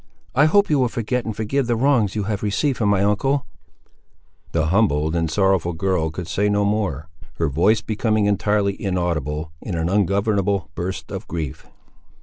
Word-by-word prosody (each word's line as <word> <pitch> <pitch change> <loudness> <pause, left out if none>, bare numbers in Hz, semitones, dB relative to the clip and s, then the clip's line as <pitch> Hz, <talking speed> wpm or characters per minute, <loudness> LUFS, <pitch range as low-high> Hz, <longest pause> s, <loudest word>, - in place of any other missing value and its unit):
I 140 +3 +5
hope 200 +6 +4
you 145 - +3
will 125 - +3
forget 120 +1 -2
and 110 - -4
forgive 115 +5 -1
the 120 - +1
wrongs 115 -5 +2
you 105 - -1
have 105 0 -2
received 110 +7 0
from 105 -3 +2
my 100 -1 +3
uncle—" 130 +7 +1 1.1
The 80 -2 +1
humbled 80 -4 +2
and 80 -1 0
sorrowful 95 -1 +1
girl 85 -1 0
could 80 +2 -6
say 105 +1 0
no 105 0 +2
more, 100 -8 -1 0.3
her 80 -3 0
voice 100 +10 +3
becoming 110 0 0
entirely 105 -1 +1
inaudible 80 -5 -2
in 95 - -4
an 80 +1 -1
ungovernable 100 -3 +1
burst 85 -3 -5
of 95 +1 -6
grief. 80 -6 -5
100 Hz, 170 wpm, -21 LUFS, 85-110 Hz, 1.1 s, I